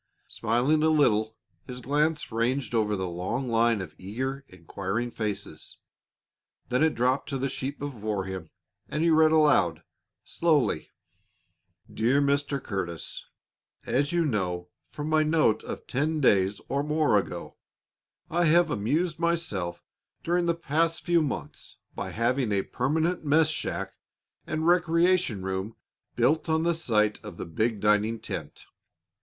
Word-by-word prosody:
Smiling 125 +8 +1
a 160 - +4
little, 110 -8 +2 0.3
his 125 0 -6
glance 150 +4 0
ranged 120 +2 -1
over 105 -2 +1
the 95 -1 -2
long 95 +10 -3
line 115 -2 +2
of 95 - -8
eager, 130 +8 -4
inquiring 95 +6 -4
faces; 100 -8 -5 0.9
then 125 +2 +1
it 160 - +2
dropped 125 +5 +1
to 140 - -2
the 135 +1 -1
sheet 135 +1 -4
before 110 -8 -3
him, 95 -4 -6 0.4
and 150 +2 -1
he 170 - +4
read 155 0 +5
aloud 145 - +3 0.4
slowly: 160 -5 +1 1.0
"My - - -17
dear 120 +6 +2 0.4
Curtis: 95 - -5 0.6
"As 140 +3 +1
you 170 -1 +2
know 90 - -2 0.2
from 150 0 -5
my 155 0 +3
note 155 -7 +2
of - - -7
ten 155 +4 -1
days 100 -6 +3
or 140 +1 0
more 150 -4 +2
ago, 90 -3 -7 0.7
I 175 +2 +1
have 165 0 +4
amused 150 - 0
myself 155 - -1 0.4
during 175 +1 +1
the 170 - +2
past 165 +1 0
few 175 -1 +3
months 145 -4 -5 0.2
by - - -5
having 120 0 0
a 100 -1 +1
permanent 160 +8 -1
mess 155 +1 +4
shack 155 - -4 0.5
and 155 +1 -2
recreation 170 - +3
room 95 +3 -3 0.4
built 155 +3 +2
on 160 0 +2
the 170 0 +2
site 105 -11 +1
of 105 -5 -9
the - - -5
big 110 +6 -1
dining 105 +2 +2
tent. 110 - -7
130 Hz, 140 wpm, -27 LUFS, 105-155 Hz, 1.0 s, read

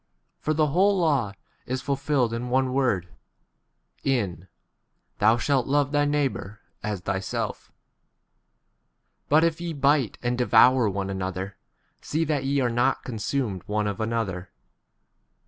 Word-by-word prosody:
For 155 - -1
the 155 -1 +2
whole 195 +3 +4
law 140 - +1 0.3
is 130 +1 -3
fulfilled 140 -4 0
in 120 +2 -3
one 130 0 +1
word, 120 -10 +1 1.0
in 100 - -1 0.7
Thou 110 +3 +5
shalt 130 0 +1
love 145 0 +2
thy 145 0 +2
neighbour 140 -8 -1 0.2
15 105 - -3
as 100 - -3
thyself; 95 +1 -3 1.6
but 155 +2 +5
if 165 0 +1
ye 170 -1 -3
bite 140 -4 +2
and 120 0 -1
devour 125 -1 +5
one 100 0 -3
another, 95 0 -4 0.5
see 160 +2 -1
that 145 -4 -1
ye 140 +1 +1
are 120 -2 +1
not 120 +3 +1
consumed 115 -3 -2
one 105 0 0
of 105 +1 -3
another. 110 -5 -2
125 Hz, 135 wpm, -25 LUFS, 105-145 Hz, 1.6 s, Thou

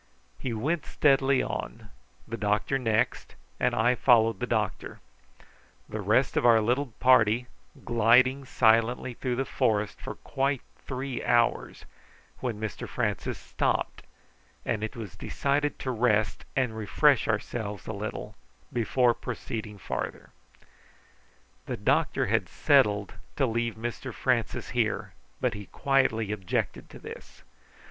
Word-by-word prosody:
He 130 - -3
went 145 +9 -1
steadily 135 -2 +3
on, 110 -2 -5 0.4
the 115 - -4
doctor 105 +5 0
next, 110 -4 0 0.2
and - - +1
I 115 +3 +3
followed 115 -4 +4
the 125 - -2
doctor; 110 -4 -2 0.9
the - - -5
rest - - +2
of - - +2
our 115 -2 +6
little 125 +6 +1
party 120 -2 +5 0.4
gliding 125 +4 +4
silently 115 +2 +2
through 125 +1 -2
the 135 +2 -1
forest 110 -7 0
for - - -6
quite 135 -1 -1 0.3
three 130 -1 -4
hours, 120 -1 +1 0.5
when 120 -5 -3
Mr 110 -1 -5
Francis - - -2
stopped, - - -1 0.6
and 110 -2 -1
it 110 - -4
was 110 -7 -7
decided 145 +1 -1
to 130 - -3
rest 110 -3 +1
and 125 -4 0
refresh 110 -3 +3
ourselves 105 -5 -3
a 110 - -4
little 105 +1 -5 0.4
before 120 +1 +3
proceeding 110 -3 -6
farther. - - -5 1.4
The - - -3
doctor - - +1
had - - 0
settled 105 -1 +3 0.2
to 135 - +2
leave 115 -1 -1
Mr 115 +1 -5
Francis - - -1
here, - - -1 0.3
but 125 -3 0
he 105 -1 -8
quietly 115 -6 +1
objected 95 -4 -2
to - - -11
this. - - -11
115 Hz, 130 wpm, -28 LUFS, 110-130 Hz, 1.4 s, our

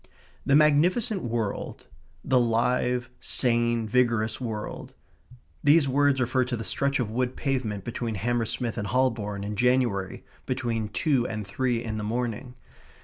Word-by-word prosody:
The 140 - +5
magnificent 175 +9 +3
world 115 -3 -3 0.4
the 130 -2 +3
live, 125 +1 +1
sane, 120 -2 +1
vigorous 115 -1 +1
world.... 110 -3 -5 0.7
These 145 0 +5
words 140 0 +3
refer 130 +1 +2
to 125 -1 -3
the 115 - -5
stretch 140 +8 0
of 115 -4 -2
wood 125 +2 -1
pavement 120 -8 -2
between 115 -1 -3
Hammersmith 115 +2 -2
and 100 - -3
Holborn 110 -4 0
in 105 +1 -4
January 120 -5 +1 0.2
between 115 -4 -2
two 130 +2 +1
and 110 -1 -4
three 120 +3 -1
in 110 -2 -4
the - - -4
morning. 120 +2 -3
120 Hz, 140 wpm, -26 LUFS, 110-130 Hz, 0.7 s, The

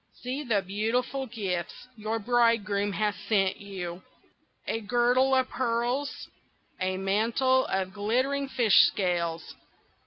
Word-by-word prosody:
"See 255 +4 -3
the 215 -7 +1
beautiful 230 +7 -1
gifts 195 -2 -4
your 220 0 -3
bridegroom 215 -3 +1
has 210 +1 0 0.2
sent 195 -3 +2
you. 185 -3 -7 0.6
A 225 - -2
girdle 245 +4 +3
of 260 -1 +2
pearls! 245 +3 -2 0.5
a 185 0 -1
mantle 230 +7 +2
of 190 0 -2
glittering 255 +7 0
fish 235 -6 +3
scales! 170 -4 -2
220 Hz, 115 wpm, -28 LUFS, 195-250 Hz, 0.6 s, girdle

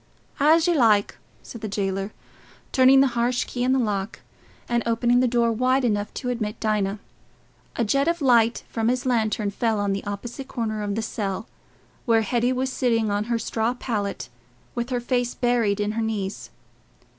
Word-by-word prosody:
"As 315 +3 +5
you 350 - +3
like," 220 -8 +3 0.2
said 230 - -10
the 215 - -3
jailer, 195 0 -2 0.6
turning 265 +1 +6
the 275 - +4
harsh 240 +1 +1
key 245 - -4
in 255 - +2
the 265 - +3
lock 210 -4 -2 0.5
and 240 0 +1
opening 240 +1 +2
the 255 - +3
door 235 -1 +2
wide 255 +3 +2
enough 205 -3 0
to 250 - -3
admit 225 -3 -3
Dinah. 210 -2 0 0.8
A 235 - 0
jet 275 +7 +1
of 340 0 +1
light 235 -5 +3
from 225 -1 -2
his 250 +1 0
lantern 220 -4 0
fell 220 +1 0
on 200 -1 0
the 195 - -3
opposite 230 +7 -6
corner 220 -4 -3
of 205 -1 -2
the 225 - -2
cell, 200 -2 -3 0.6
where 225 -1 +4
Hetty 240 +3 +1
was 260 +1 -1
sitting 230 -5 +1
on 205 +1 0
her 235 0 0
straw 225 +1 -1
pallet 210 -5 -3 0.5
with 240 +1 -3
her 250 -1 0
face 245 0 -1
buried 235 -5 +1
in 205 0 0
her 225 +1 -2
knees. 210 -3 -3
230 Hz, 180 wpm, -24 LUFS, 210-250 Hz, 0.8 s, turning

